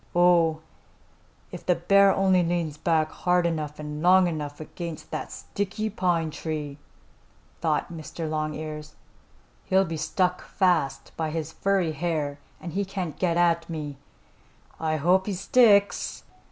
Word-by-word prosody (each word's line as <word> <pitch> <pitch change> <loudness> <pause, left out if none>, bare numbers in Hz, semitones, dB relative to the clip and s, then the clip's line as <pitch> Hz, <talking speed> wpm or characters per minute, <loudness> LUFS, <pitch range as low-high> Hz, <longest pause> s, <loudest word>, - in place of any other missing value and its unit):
"Oh, 170 -3 +4 0.9
if - - -8
the 180 - +2
bear 195 +4 +5
only 190 -2 +3
leans 170 -3 -1
back 155 0 +1
hard 180 -1 +1
enough 155 -3 -2
and 150 0 -6
long 185 +2 +6
enough 150 -3 -4
against 165 +1 -7
that - - -4
sticky 210 +2 -3
pine 175 -5 0
tree," 150 -3 -5 0.8
thought - - -1
Mr. 160 0 -6
Longears, 155 0 -4 0.7
"he'll 190 +1 +3
be 165 -2 -4
stuck 180 +3 0
fast 175 -8 0
by 160 -1 -2
his 160 0 -4
furry 195 -4 +1
hair 155 -3 -2 0.2
and 170 - -7
he 200 +2 0
can't 185 -5 -5
get 170 -1 +2
me. 150 -4 -5 0.8
I 160 -1 0
hope 180 +6 +2
he 200 - -1
sticks!" 205 -1 +3
170 Hz, 135 wpm, -26 LUFS, 155-185 Hz, 0.9 s, long